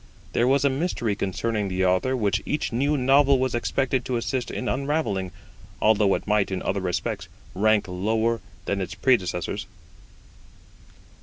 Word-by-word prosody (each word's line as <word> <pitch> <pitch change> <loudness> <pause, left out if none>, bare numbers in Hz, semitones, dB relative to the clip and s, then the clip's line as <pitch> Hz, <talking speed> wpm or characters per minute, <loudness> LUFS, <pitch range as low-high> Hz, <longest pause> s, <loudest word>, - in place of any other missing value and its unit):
There 120 - +2
was 140 +2 +3
a - - +5
mystery 130 - -1
concerning 105 +2 -2
the 95 0 0
Author 95 +9 +2
which 105 -4 +1
each 150 -4 -2
new 140 +5 +1
novel 135 +1 +4
was 130 -1 0
expected 130 +2 0
to 125 - -1
assist 125 +2 -2
in 125 - -4
unravelling, 130 - -1 0.5
although 105 -2 +4
it - - -5
might 105 -1 +2
in 95 -1 -3
other 100 - -1
respects 90 -1 -2 0.3
rank 105 +2 +3
lower 110 +5 0 0.2
than 100 -1 -1
its 95 +3 -4
predecessors. 100 -6 0
115 Hz, 150 wpm, -25 LUFS, 100-130 Hz, 0.5 s, a